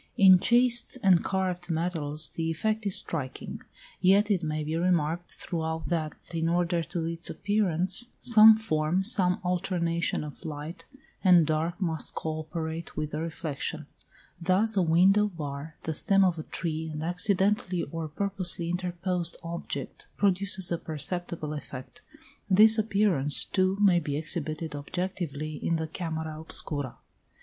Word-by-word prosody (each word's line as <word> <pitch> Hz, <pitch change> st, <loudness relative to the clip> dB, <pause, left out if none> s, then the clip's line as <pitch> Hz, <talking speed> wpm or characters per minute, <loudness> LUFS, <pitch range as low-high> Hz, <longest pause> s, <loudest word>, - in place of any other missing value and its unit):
In 190 Hz, -2 st, +7 dB
chased 240 Hz, +3 st, +3 dB
and 185 Hz, -3 st, +5 dB
carved 185 Hz, -2 st, -2 dB
metals 160 Hz, -3 st, 0 dB
the 165 Hz, -1 st, -3 dB
effect 215 Hz, +6 st, -1 dB
is 195 Hz, -, +2 dB
striking: 140 Hz, -6 st, -2 dB, 0.4 s
yet 200 Hz, +3 st, +4 dB
it 190 Hz, -4 st, +1 dB
may 155 Hz, -1 st, -3 dB
be 155 Hz, +2 st, -3 dB
remarked 170 Hz, -1 st, 0 dB
throughout 160 Hz, -1 st, -4 dB
that, 160 Hz, -3 st, -2 dB, 0.2 s
in 165 Hz, 0 st, 0 dB
order 175 Hz, 0 st, +1 dB
to 165 Hz, 0 st, -4 dB
its 165 Hz, 0 st, -1 dB
appearance, 195 Hz, +1 st, +2 dB
some 220 Hz, -2 st, +7 dB
form, 170 Hz, -3 st, 0 dB
some 190 Hz, -4 st, +2 dB
alternation 175 Hz, -3 st, -1 dB
of 150 Hz, +2 st, -10 dB
light 160 Hz, +2 st, -7 dB, 0.4 s
and 180 Hz, -4 st, +6 dB
dark 160 Hz, +3 st, -1 dB
must 165 Hz, -5 st, -2 dB
co 155 Hz, 0 st, -3 dB
operate 160 Hz, +1 st, -6 dB
with 150 Hz, 0 st, -3 dB
the 150 Hz, -, -3 dB
reflection; 160 Hz, -3 st, -5 dB, 0.6 s
thus 195 Hz, +6 st, +2 dB
a 195 Hz, -, +3 dB
window 185 Hz, +5 st, +4 dB
bar, 155 Hz, -4 st, -7 dB
the 160 Hz, -, -3 dB
stem 195 Hz, +5 st, +3 dB
of 175 Hz, -3 st, 0 dB
a -, -, -5 dB
tree, 160 Hz, -1 st, -4 dB
an 150 Hz, 0 st, -5 dB
accidentally 185 Hz, +1 st, 0 dB
or 165 Hz, -1 st, -5 dB
purposely 180 Hz, 0 st, -3 dB
interposed 180 Hz, -1 st, -3 dB
object 170 Hz, 0 st, -6 dB
produces 190 Hz, -2 st, +1 dB
a 170 Hz, -, -1 dB
perceptible 160 Hz, 0 st, -4 dB
effect. 145 Hz, -, -9 dB, 0.5 s
This 215 Hz, +3 st, +6 dB
appearance, 195 Hz, -10 st, +3 dB
too, 190 Hz, 0 st, 0 dB
may 195 Hz, -4 st, +4 dB
be 145 Hz, -3 st, -3 dB
exhibited 155 Hz, 0 st, -1 dB
objectively 155 Hz, -1 st, -4 dB
in 165 Hz, -, +1 dB
the 160 Hz, 0 st, -2 dB
camera 160 Hz, -1 st, -5 dB
obscura. 145 Hz, -4 st, -3 dB
170 Hz, 140 wpm, -27 LUFS, 160-190 Hz, 0.6 s, In